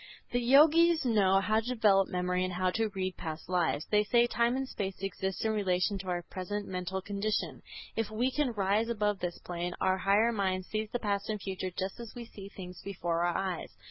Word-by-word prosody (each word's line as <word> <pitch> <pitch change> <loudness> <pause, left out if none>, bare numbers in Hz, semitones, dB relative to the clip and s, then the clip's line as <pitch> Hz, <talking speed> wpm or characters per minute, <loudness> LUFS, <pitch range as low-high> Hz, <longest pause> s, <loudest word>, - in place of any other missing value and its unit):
The 245 - +1
Yogis 315 +6 +6
know 195 -5 +4
how 215 +2 +2
to 225 - -6
develop 210 -6 +4
memory 180 0 0
and 185 0 -2
how 185 +1 +1
to 225 +3 0
read 185 -2 -3
past 160 -1 -6
lives. 175 -4 0
They 210 0 +4
say, 235 +3 +4
time 235 0 +1
and 265 0 -2
space 195 -6 -4
exist 190 +1 -3
in 220 - +2
relation 195 -1 +1
to 190 - -8
our 175 -1 -1
present 205 +3 -4
mental 185 0 -3
condition; 205 +2 -2 0.3
if 225 -2 -1
we 240 +4 0
can 295 -1 +1
rise 205 +2 +1
above 210 -3 0
this 175 -1 -3
plane, 175 0 -3
our 190 0 +2
higher 205 +5 +3
mind 190 -4 -1
sees 215 +1 -3
the 245 - -1
past 200 -3 -2
and 215 -1 -1
future 190 -1 -4
just 190 +4 -4
as 235 -2 -9
we 240 -1 -6
see 200 -3 -10
things 180 -4 -9
before 175 -4 -2
our 175 - +1
eyes. 190 -3 -3
200 Hz, 210 wpm, -31 LUFS, 185-220 Hz, 0.3 s, Yogis